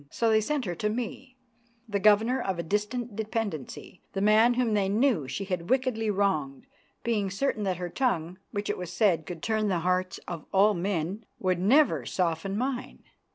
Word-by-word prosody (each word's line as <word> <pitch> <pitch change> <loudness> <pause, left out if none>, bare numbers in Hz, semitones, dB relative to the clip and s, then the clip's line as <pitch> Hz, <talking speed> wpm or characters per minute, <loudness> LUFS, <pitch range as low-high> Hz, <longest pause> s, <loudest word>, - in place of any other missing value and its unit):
So 230 +6 +1
they 220 0 +4
sent 285 +2 -1
her 175 - -2
to 210 +5 -1
me, 250 +3 -5 0.5
the 205 -2 -1
governor 215 +5 +4
of 190 -5 -2
a 170 - -2
distant 210 +5 -2
dependency, 210 - -4
the 195 - -2
man 220 +4 +5
whom 240 -3 +1
they 200 -2 +2
knew 215 - +2
she 195 - -3
had 180 -2 -3
wickedly 250 -4 +1
wronged, 190 - 0 0.4
being 215 -4 0
certain 215 +3 -1
that 185 -3 0
her 180 0 -3
tongue, 180 -5 -1
which 205 0 -4
it - - -2
was 180 -1 -5
said 180 -6 +2
could 175 -3 -7
turn 215 -1 +1
the 180 -4 0
hearts 185 0 0
of 170 -4 -6
all 200 +2 +5
men, 185 +2 -2
would 185 -2 0
never 205 - +4
soften 180 +3 -1
mine. 255 +1 -3
205 Hz, 185 wpm, -28 LUFS, 180-225 Hz, 0.5 s, man